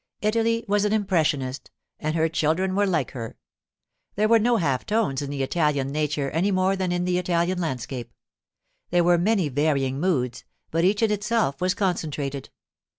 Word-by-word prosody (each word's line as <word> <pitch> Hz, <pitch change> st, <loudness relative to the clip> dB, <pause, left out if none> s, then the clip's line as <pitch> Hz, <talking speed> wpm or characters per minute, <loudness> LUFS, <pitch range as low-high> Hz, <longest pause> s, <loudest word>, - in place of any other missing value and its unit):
Italy 230 Hz, +2 st, +1 dB
was 205 Hz, 0 st, +2 dB
an 210 Hz, 0 st, +1 dB
impressionist, 155 Hz, -10 st, 0 dB, 0.3 s
and 155 Hz, +1 st, -2 dB
her 160 Hz, 0 st, +2 dB
children 165 Hz, +4 st, 0 dB
were 200 Hz, +1 st, +2 dB
like 160 Hz, -8 st, 0 dB
her. 115 Hz, -3 st, -7 dB, 0.8 s
There 215 Hz, +2 st, +2 dB
were 230 Hz, +1 st, +5 dB
no 235 Hz, +2 st, +3 dB
half 140 Hz, -, 0 dB
tones 210 Hz, -12 st, 0 dB
in 140 Hz, -, -4 dB
the 140 Hz, -1 st, -2 dB
Italian 145 Hz, -2 st, 0 dB
nature 150 Hz, -1 st, -1 dB
any 175 Hz, +6 st, +1 dB
more 190 Hz, 0 st, +2 dB
than 185 Hz, -2 st, -1 dB
in 175 Hz, 0 st, 0 dB
the 180 Hz, 0 st, +1 dB
Italian 175 Hz, 0 st, 0 dB
landscape. 130 Hz, -6 st, -4 dB, 0.8 s
There 175 Hz, 0 st, +3 dB
were 175 Hz, 0 st, +4 dB
many 195 Hz, -2 st, +2 dB
varying 140 Hz, -1 st, 0 dB
moods, 125 Hz, -9 st, -1 dB, 0.3 s
but 165 Hz, +1 st, +1 dB
each 200 Hz, +4 st, +2 dB
in 220 Hz, -, +3 dB
itself 210 Hz, -8 st, 0 dB
was 185 Hz, +1 st, +1 dB
concentrated. 150 Hz, -8 st, -2 dB
170 Hz, 170 wpm, -24 LUFS, 145-195 Hz, 0.8 s, were